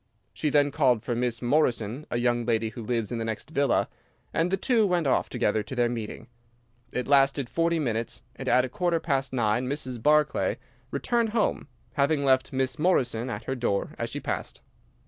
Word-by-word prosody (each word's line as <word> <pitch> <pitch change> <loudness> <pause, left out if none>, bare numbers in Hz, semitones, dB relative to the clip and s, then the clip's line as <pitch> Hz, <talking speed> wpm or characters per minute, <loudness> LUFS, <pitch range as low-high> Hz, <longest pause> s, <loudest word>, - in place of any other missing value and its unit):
She 150 - -1
then 145 0 +3
called 130 -7 +2
for 120 - -2
Miss 120 0 -1
Morrison, 125 -1 +1
a - - -1
young 120 0 +1
lady 115 -1 0
who 115 +2 -8
lives 115 -2 -2
in 120 - -2
the - - -2
next 115 +6 -5
villa, 140 -4 +2 0.5
and 165 +2 +1
the 195 - +1
two 225 0 +2
went 175 -3 +1
off 135 - +1
together 105 +1 +1
to 105 +5 -7
their 120 -1 +2
meeting. 115 -3 -5 0.7
It 125 - -3
lasted 140 -1 +3
forty 165 +6 +1
minutes, 115 -6 -2
and - - -4
at 125 +1 +4
a - - -6
quarter 175 +4 0
past 135 -5 -1
nine 120 0 0
Mrs. 130 -4 -3
Barclay 150 +3 +2 0.3
returned 235 -2 0
home, 215 - 0 0.3
having 140 +1 +1
left 130 -1 +3
Miss 130 -1 -1
Morrison 130 -8 +1
at 115 -2 -5
her 130 - -3
door 120 -6 -1
as - - -2
she - - -4
passed. - - -4
130 Hz, 190 wpm, -27 LUFS, 120-150 Hz, 0.7 s, at